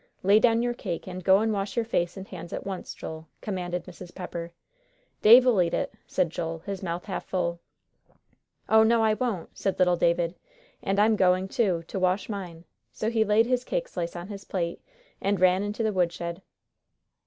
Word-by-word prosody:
"Lay 200 +3 +6
down 230 0 +3
your 240 0 0
cake, 185 -7 -5
and 185 0 -6
go 190 +1 +6
and 220 +1 +1
wash 195 0 -3
your 235 -2 +1
face 175 -5 -1
and 190 0 -7
hands 170 -2 -9
at - - -5
once, 190 -2 -5
Joel," 160 0 -8
commanded 180 -3 -4
Mrs. 180 -1 -11
Pepper. 170 -2 -6 0.7
"Dave'll 240 -2 +7
eat 170 -1 +1
it," - - -2
said 180 -4 0
Joel, 165 -1 -3
his 200 -2 -4
mouth 175 -2 -4
half 195 - -4
full. 170 -2 -2 1.1
"Oh, 220 0 +6
no, 225 +1 +4
I 220 -1 +4
won't," 215 -7 -3
said 195 - -1
little 180 -1 +3
David, 170 0 +2 0.5
"and 195 - -1
I'm 215 +1 +5
going 185 -1 +3
too, 190 -6 0
to 190 - -5
wash 185 +3 +1
mine." 180 -5 -6 0.3
So 220 - -2
he 225 -2 +3
laid 215 +2 +4
his 250 0 0
cake - - -2
slice 170 - -4
on 175 +3 -7
his 200 -1 -7
plate, 170 -4 -3 0.4
and 200 -1 +1
ran 185 +1 +4
into 205 +2 -2
the 215 -1 +1
woodshed. 170 -1 -1
190 Hz, 190 wpm, -27 LUFS, 175-215 Hz, 1.1 s, Dave'll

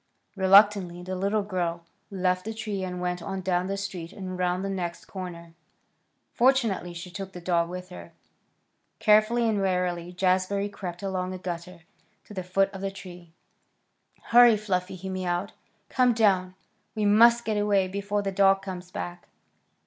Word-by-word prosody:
Reluctantly 190 -2 +4
the 185 +1 -4
little 200 +3 0
girl 175 -4 -3 0.2
left 185 -1 0
the 220 +2 -5
tree 210 -3 -4
and 180 -1 -4
went 180 0 -2
on 195 +2 -4
down 185 -1 0
the 195 +1 -2
street 190 -4 -5
and 190 -2 -7
around 180 0 -1
the - - -2
next 180 -3 -4
corner. 170 -3 -8 0.8
Fortunately 235 -8 +2
she 175 +1 -8
took 195 +1 -7
the 180 - -7
dog 170 -1 0
with 180 +1 -7
her. 180 - -10 0.9
Carefully 215 +2 +4
and 210 -3 +1
warily 180 -2 -1
Jazbury 190 +2 +1
crept 180 -2 -7
along 185 -1 -2
a - - -5
gutter 180 -1 -6 0.4
to - - -12
the 190 - -3
foot 195 +2 +1
of 190 - -7
the 195 - -1
tree. 180 -3 -11 0.9
"Hurry, 240 -2 +6
Fluffy!" 185 -3 -2
he 190 +1 -8
mewed. 185 0 -2 0.4
"Come 250 -2 +3
down. 190 -5 +2 0.4
We 215 -1 0
must 235 +3 +6
get 215 -1 0
away 205 -2 +2
before 200 +2 -2
the 195 - -2
dog 195 0 +3
comes 180 -2 -7
back." 175 -1 -7
190 Hz, 165 wpm, -26 LUFS, 180-200 Hz, 0.9 s, Hurry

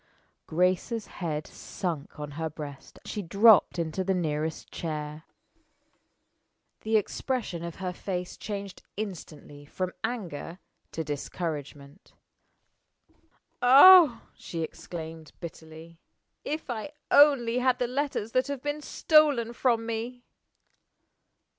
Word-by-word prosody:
Grace's 185 +6 0
head 155 -4 -4
sunk 165 -6 -6
on 150 -1 -5
her 160 +2 -3
breast; 145 -3 -9
she 210 - -4
dropped 200 +3 +5
into 170 +2 -2
the 190 0 0
nearest 155 -2 -2
chair. 155 -1 -5 1.5
The 220 0 +2
expression 210 -4 -3
of 170 -1 -6
her 185 -1 -4
face 180 -1 -4
changed 200 -2 -6 0.2
instantly 160 -8 -7
from 185 +5 -4
anger 185 -8 -4 0.4
to 160 - -2
discouragement. 145 0 -6 1.5
"Ah," 280 +1 +8
she 165 -1 -5
exclaimed, 160 -1 -8
bitterly, 160 0 -10 0.4
"if 305 +2 -4
I 240 +6 -5 0.2
only 255 -5 +5
had 250 0 +2
the 250 - 0
letters 255 -3 -2
that 255 +2 +1
have 280 -2 -5
been 290 +1 -2
stolen 290 -7 +3
from 235 -2 +1
me!" 230 +2 -4
185 Hz, 110 wpm, -28 LUFS, 160-240 Hz, 1.5 s, Ah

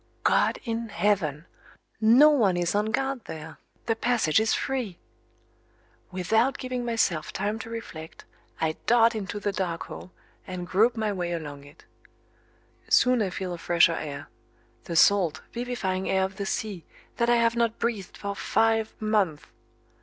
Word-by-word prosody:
God - - +3
in 230 -1 -3
heaven! 175 -8 0 0.5
No 240 +8 +7
one 210 -11 +3
is 175 -1 0
on 210 +1 +1
guard 270 +2 -2
there 160 0 -8 0.3
the 225 - +1
passage 225 -9 +2
is 220 0 +1
free! 245 -9 -3 1.1
Without 220 +8 +1
giving 255 -1 -4
myself 225 -9 0
time 210 +2 -2
to 225 - -8
reflect 165 -9 -8 0.3
I 160 -1 -1
dart 235 0 +5
into 205 -2 -4
the 205 0 -1
dark 180 -4 -3
hole, - - -9 0.4
and 180 -1 -5
grope 220 +7 +2
my 215 -2 0
way 175 -2 -2
along 145 -4 -6
it. 145 - -17 1.0
Soon 250 -2 +4
I 200 - 0
feel 185 0 -4
a 175 - -7
fresher 170 0 +4
air 145 -3 -5 0.6
the 170 - -4
salt, 170 -3 +4
vivifying 235 -6 -2
air 190 0 +2
of 190 0 -4
the 200 -1 -3
sea, 200 -5 -3 0.3
that 235 0 +1
I 240 - +5
have 235 0 +2
not 230 -1 +1
breathed 225 -5 -3
for 200 0 -4
five 225 +1 +1
months. 205 -8 0
205 Hz, 155 wpm, -26 LUFS, 175-230 Hz, 1.1 s, No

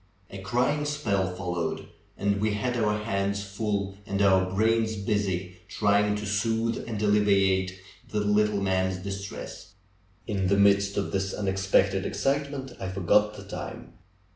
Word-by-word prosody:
A 100 - -7
crying 125 +9 0
spell 105 -11 0
followed, 90 -2 -3 0.3
and 100 0 0
we 105 -1 +1
had 120 +4 -1
our 105 -3 +1
hands 100 -1 -1
full 100 -1 -2
and 100 -1 -2
our 95 -2 +4
brains 110 +2 +2
bus}" 105 0 0 0.4
trying 105 0 +2
to 105 0 -4
soothe 115 +3 0
and 110 -2 -3
alleviate 100 -3 +2 0.3
the 105 - -1
little 105 0 +2
man's 95 -1 +1
distress. 100 -1 -7 0.5
In 95 -3 -1
the 100 +1 +3
midst 100 0 +4
of 100 - -1
this 95 0 -1
unexpected 95 -1 +1
excitement 140 -1 -2
I 95 - -4
forgot 100 +3 +2
the - - -9
time. - - -7
100 Hz, 140 wpm, -27 LUFS, 95-105 Hz, 0.5 s, our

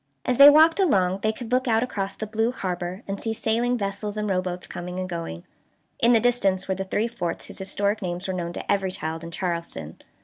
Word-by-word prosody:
As 250 - 0
they 280 +1 +12
walked 320 +4 +6
along 190 - +3
they 215 - +2
could 230 +1 -8
look 255 +1 +2
out 225 0 +3
across 200 -5 -3
the 215 - -4
blue 220 +2 0
harbor, 185 -2 -4
and 195 0 -4
see 225 - -1
sailing 235 +3 0
vessels 205 0 -3
and 210 0 -1
rowboats 185 -2 -2
coming 180 +1 -6
and 185 - -3
going. 165 - -5 0.6
In 235 - +4
the 230 - +6
distance 200 -6 +1
were 190 - +1
the 190 +1 -4
three 210 +4 0
forts 175 -7 -4
whose - - -10
historic 200 +2 -1
names 180 0 -4
were 190 - -2
known 175 -2 -3
to - - -3
every 195 -2 +1
child 160 -2 -4
in 170 - -6
Charleston. 170 - -4
195 Hz, 225 wpm, -25 LUFS, 180-225 Hz, 0.6 s, they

